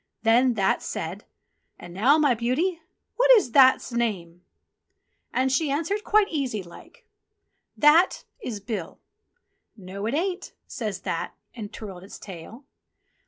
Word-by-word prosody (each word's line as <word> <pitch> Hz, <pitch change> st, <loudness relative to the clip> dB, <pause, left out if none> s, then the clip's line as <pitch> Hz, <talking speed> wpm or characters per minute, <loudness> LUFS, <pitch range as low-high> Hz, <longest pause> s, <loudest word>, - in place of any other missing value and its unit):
Then 240 Hz, +2 st, +4 dB
That 195 Hz, -2 st, +1 dB
said, 175 Hz, +6 st, -5 dB, 0.5 s
"And 175 Hz, -, -11 dB
now, 250 Hz, -, +4 dB
my 290 Hz, -5 st, +3 dB
beauty, 285 Hz, +10 st, -1 dB, 0.4 s
what -, -, +3 dB
is 405 Hz, -, +3 dB
That's 260 Hz, 0 st, +5 dB
name? 185 Hz, -8 st, -3 dB, 0.5 s
" -, -, -50 dB
And 260 Hz, +1 st, +1 dB
she 285 Hz, +3 st, +1 dB
answered 330 Hz, +9 st, -1 dB
quite 425 Hz, -1 st, +3 dB
easy 260 Hz, -, -2 dB
like: 170 Hz, -1 st, -16 dB, 0.7 s
"That 315 Hz, +5 st, +4 dB, 0.2 s
is 230 Hz, -, -5 dB
Bill." 195 Hz, -4 st, -6 dB, 0.8 s
"No, 195 Hz, +2 st, -6 dB
it 245 Hz, -, -1 dB
ain't," 360 Hz, +3 st, -3 dB
says 210 Hz, -5 st, -5 dB
That, 165 Hz, -, -4 dB, 0.2 s
and 215 Hz, -4 st, -8 dB
twirled 190 Hz, -5 st, -9 dB
its 195 Hz, -, -11 dB
tail. 195 Hz, -, -11 dB
235 Hz, 135 wpm, -25 LUFS, 195-295 Hz, 0.8 s, That's